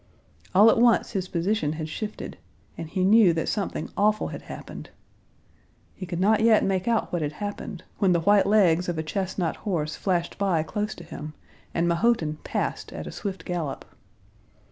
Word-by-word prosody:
All 210 +4 +8
at - - +1
once 235 -1 +4
his 190 -2 -2
position 175 -3 0
had 155 0 -4
shifted 210 +7 -6 0.4
and 165 - -7
he 185 +2 -1
knew 200 -2 +6
that 160 - -2
something 205 -3 -2
awful 210 +1 +2
had - - -7
happened. - - -9 1.0
He 185 - -8
could 175 -1 -4
not 210 +3 +4
yet 225 -1 +5
make 190 0 0
out 230 -5 0
what 175 - 0
had 150 0 -2
happened, 205 0 -6 0.2
when 195 -2 +3
the 170 -1 +2
white 205 +3 +4
legs 180 -4 +4
of 170 - -2
a 160 - -1
chestnut 185 0 -2
horse 155 -7 -2
flashed 175 -2 -1
by 185 -6 +2
close 210 +5 -3
to - - -11
him, 150 +1 -8 0.4
and 170 0 0
Mahotin 170 -4 +1
passed - - -3
at - - -6
a - - -6
swift 195 -2 -5
gallop. 165 -6 -3
185 Hz, 180 wpm, -25 LUFS, 165-210 Hz, 1.0 s, All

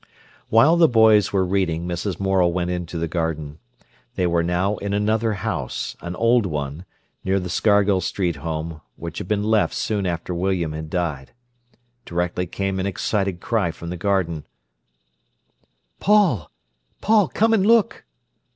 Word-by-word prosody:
While 140 +10 +5
the 170 -1 +6
boys 110 -5 +5
were 95 -2 +2
reading, 90 -3 -1
Mrs. 90 +1 -3
Morel 95 -3 +2
went 90 0 -1
into 90 -1 -4
the 85 0 -1
garden. 80 -2 -3 0.6
They 90 - 0
were 85 -1 +2
now 90 +4 0
in 100 0 -3
another 110 +2 +1
house, 95 - -4
an 85 +1 -5
old 115 -1 +3
one, 75 +1 -4 0.4
near 95 +1 +1
the 90 -1 -5
Scargill 100 -3 +3
Street 90 -2 -1
home, 80 +1 -5
which 85 -1 -7
had - - -6
been 105 0 0
left 110 0 +2
soon 100 -3 -1
after 85 +1 -3
William 90 -2 -1
had 80 0 -6
died. 80 -7 -3 0.7
Directly 90 -1 -2
came 95 +2 -2
an 95 - -1
excited 95 -1 -1
cry 110 -7 0
from 85 +1 -7
the - - -3
garden: 90 -4 -1 1.5
"Paul! 180 - +3 0.5
Paul! 215 -2 +4
come 225 +1 +2
and 210 -4 +3
look!" 225 -1 +3
95 Hz, 150 wpm, -22 LUFS, 85-105 Hz, 1.5 s, the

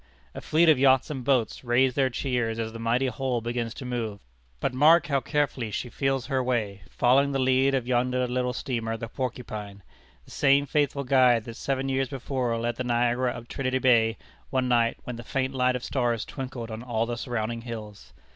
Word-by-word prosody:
A - - -7
fleet 165 +2 +3
of 155 -5 +6
yachts 130 +1 +4
and 135 -4 -5
boats 125 -4 +1
raise 125 +1 +3
their 135 -1 +2
cheers 120 -3 -1
as 110 -1 -3
the 115 - -7
mighty 115 +3 +1
hull 125 0 -1
begins 120 0 -3
to 130 - -8
move. 115 -5 -3 0.4
But 130 - -1
mark 155 +5 +5
how 140 -4 +1
carefully 140 -4 -1
she 125 +4 -4
feels 135 0 -1
her 135 -2 0
way, 110 -6 -1
following 135 +3 +3
the - - +1
lead 130 +1 +3
of 130 -3 -1
yonder 125 0 +1
little 125 0 -1
steamer, 115 -3 -3
the 115 - -6
Porcupine, 110 -6 -6 0.4
the - - -16
same 140 0 +3
faithful 145 0 0
guide 125 -3 +4
that 115 - -8
seven 135 +1 -2
years 135 0 0
before 130 -3 -2
led 120 0 -2
the 130 - -2
Niagara 120 +1 +1
up 120 0 -9
Trinity 130 0 -1
Bay 115 -3 +3 0.3
one 130 -1 0
night 120 -2 +2
when 125 -2 -6
the 120 - -8
faint 130 +2 -2
light 125 -1 +2
of 125 - -4
stars 120 -4 -1
twinkled 130 -4 -6
on 110 +1 -6
all 115 -2 -1
the 120 0 -3
surrounding 115 -1 -3
hills. 110 -3 -8
125 Hz, 200 wpm, -26 LUFS, 115-135 Hz, 0.4 s, of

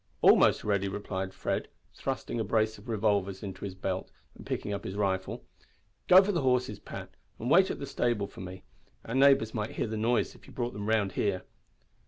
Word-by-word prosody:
"Almost - - +6
ready," 100 -2 +1
replied 95 -1 -4
Fred, - - -2 0.3
thrusting 120 - -3
a - - +1
brace 110 0 +1
of 120 - -13
revolvers 100 -3 0
into 95 -1 -6
his 95 -2 -6
belt 95 -1 -3 0.2
and - - -12
picking 105 - -3
up 100 - -4
his 95 - -5
rifle. 95 -2 -1 0.6
"Go 185 +1 +9
for 205 - 0
the 175 - 0
horses, 125 -5 +1
Pat, - - -8 0.3
and 120 +4 -3
wait 190 +3 +6
at - - -3
the 140 - -5
stable 120 -6 0
for 100 - -11
me. 90 0 -8 0.4
Our 115 - -5
neighbours 135 -4 +5
might 105 -1 -3
hear - - -1
the 110 -1 -3
noise 115 +3 +1
if - - -18
you - - -13
brought 120 -1 -2
them 105 +1 -4
round 105 -3 +2
here." 95 0 -1
105 Hz, 205 wpm, -30 LUFS, 95-120 Hz, 0.6 s, Go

